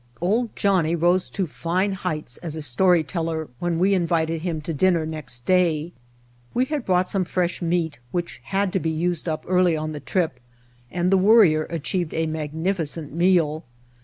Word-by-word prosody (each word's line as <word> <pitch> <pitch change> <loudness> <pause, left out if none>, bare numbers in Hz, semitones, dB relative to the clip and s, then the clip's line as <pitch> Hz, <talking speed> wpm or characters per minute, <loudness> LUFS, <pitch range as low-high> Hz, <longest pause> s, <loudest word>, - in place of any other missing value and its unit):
"Old 220 +7 0
Johnnie" 180 -5 +2
rose 175 +2 +2
to 195 - -2
fine 175 +5 -1
heights 155 -9 -3
as 160 -3 -5
a 160 - -4
story 170 +5 +3
teller 160 -1 -3
when 175 -1 -1
we 190 +4 +3
invited 165 -3 0
him 165 -2 -2
to 165 +2 -4
dinner 170 +1 +2
next 150 -6 -5
day. 175 -3 +2 0.6
We 250 - +3
had 290 -2 -3
brought 180 -1 +2
some 195 -1 0
fresh 180 0 -1
meat 165 -4 -1
which 175 +5 -4
had 195 -1 0
to 190 - +2
be 165 - -1
used 170 +1 -1
up 155 - -3
early 180 -3 +3
on 155 0 -3
the 150 - -5
trip, 160 -6 -1 0.5
and 175 +6 0
the 195 - +5
Worrier 185 -7 +5
achieved 170 +1 -2
a 160 - +1
magnificent 160 0 -3
meal. 165 -3 +2
170 Hz, 175 wpm, -23 LUFS, 155-185 Hz, 0.6 s, the